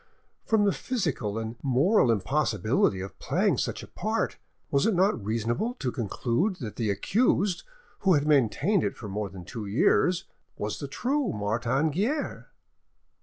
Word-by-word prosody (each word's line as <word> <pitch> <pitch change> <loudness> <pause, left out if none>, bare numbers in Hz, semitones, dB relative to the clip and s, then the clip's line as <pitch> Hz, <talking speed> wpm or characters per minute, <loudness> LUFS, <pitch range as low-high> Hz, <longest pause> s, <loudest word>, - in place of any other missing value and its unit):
From 220 -2 +3
the 200 - +4
physical 160 - -2
and 115 +1 -4
moral 140 - +3
impossibility 110 -3 +1
of 95 - -8
playing - - +1
such - - -2
a - - -10
part, - - -2 0.3
was 140 +6 +3
it 220 - +2
not 185 - +2
reasonable 115 - -1
to 130 - -2
conclude 120 - -1
that 120 - -7
the 115 -3 -1
accused, 195 - +1 0.4
who 190 -3 +4
had 145 0 +1
maintained 150 - +3
it - - -2
for 110 - -7
more 100 +1 -3
than 95 -2 -10
two 110 +1 -6
years, 175 - +2 0.3
was - - -3
the - - -4
true 275 +1 -1
Martin 120 +8 0
Guerre? 230 - -2
135 Hz, 155 wpm, -27 LUFS, -, 0.4 s, the